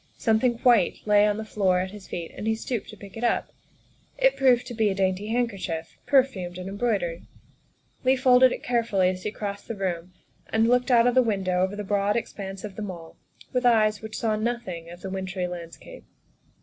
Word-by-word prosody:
Something 225 +2 +2
white 235 -8 +4
lay 210 0 +5
on 210 0 0
the 220 - -5
floor 190 -4 +1
at 185 +1 -3
his 205 -2 -11
feet 170 -2 -5
and 215 - -5
he 220 - +2
stooped 230 0 -4
to 215 - -10
pick 200 -1 -12
it 225 - -6
up. 240 - 0 0.6
It - - +3
proved 250 -2 +3
to - - -7
be 220 -2 +2
a 195 - -1
dainty 190 +1 0
handkerchief, 200 -8 -2
perfumed 210 -11 +2
and 185 0 -6
embroidered. 195 -5 -2 0.8
Leigh 260 +1 +4
folded 255 -1 +5
it - - -5
carefully 225 -6 +1
as 185 0 -4
he 210 - -2
crossed 200 -1 -6
the 230 - -4
room 180 -2 -3 0.4
and 220 +1 +2
looked 250 +2 +2
out 235 -2 +5
of 245 - +3
the 255 - +6
window 190 -6 0
over 190 +2 0
the 210 - -4
broad 205 +1 +1
expanse 195 -4 -5
of 205 -3 -8
The - - -4
Mall 175 -5 -7 0.4
with 250 0 +1
eyes 215 -3 +3
which 220 0 -6
saw 220 -2 0
nothing 215 -7 -3
of 175 +1 -11
the 190 - -6
wintry 190 -1 -3
landscape. 175 -2 -9
210 Hz, 205 wpm, -25 LUFS, 185-235 Hz, 0.8 s, the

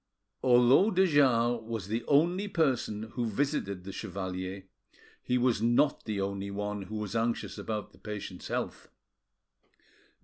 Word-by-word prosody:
Although 125 - +5
de 190 -2 +4
Jars 120 -7 +3
was 110 -4 -5
the 115 +3 -2
only 175 +8 +3
person 120 - 0
who 120 -2 -2
visited 100 -5 -1
the 95 - -7
chevalier, 95 -1 -5 0.6
he 125 - 0
was 125 -3 +2
not 120 +6 +2
the 105 -3 -2
only 100 0 -2
one 105 +1 -3
who 100 +3 -7
was 105 -1 -4
anxious 115 +1 -1
about 105 -2 -4
the - - -20
patient's 105 -4 -6
health. - - -3
115 Hz, 140 wpm, -30 LUFS, 100-130 Hz, 0.6 s, Although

